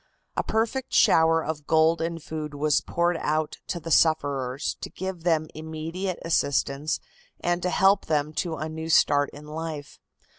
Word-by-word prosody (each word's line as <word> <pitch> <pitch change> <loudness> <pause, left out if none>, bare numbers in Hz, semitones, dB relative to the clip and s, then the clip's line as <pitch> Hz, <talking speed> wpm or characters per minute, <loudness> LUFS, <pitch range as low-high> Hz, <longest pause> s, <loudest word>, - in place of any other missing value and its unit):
A - - +1
perfect 230 +4 -1
shower 165 0 +5
of 150 -2 -4
gold 160 +1 +3
and 165 -1 -3
food 150 -1 -5
was 150 0 +2
poured 170 0 0
out 155 0 -1
to 175 - -3
the 165 0 -7
sufferers 140 -4 +2
to - - -5
give 190 -2 -5
them 160 -2 +2
immediate 160 +4 -4
assistance 145 -2 0 0.4
and 175 0 0
to 180 - 0
help 195 +2 +3
them 150 -1 0
to 165 0 -2
a 155 +1 -4
new 160 +1 -6
start 145 -3 +4
in 145 +1 -12
life. 155 -1 -6
160 Hz, 160 wpm, -26 LUFS, 150-170 Hz, 0.4 s, shower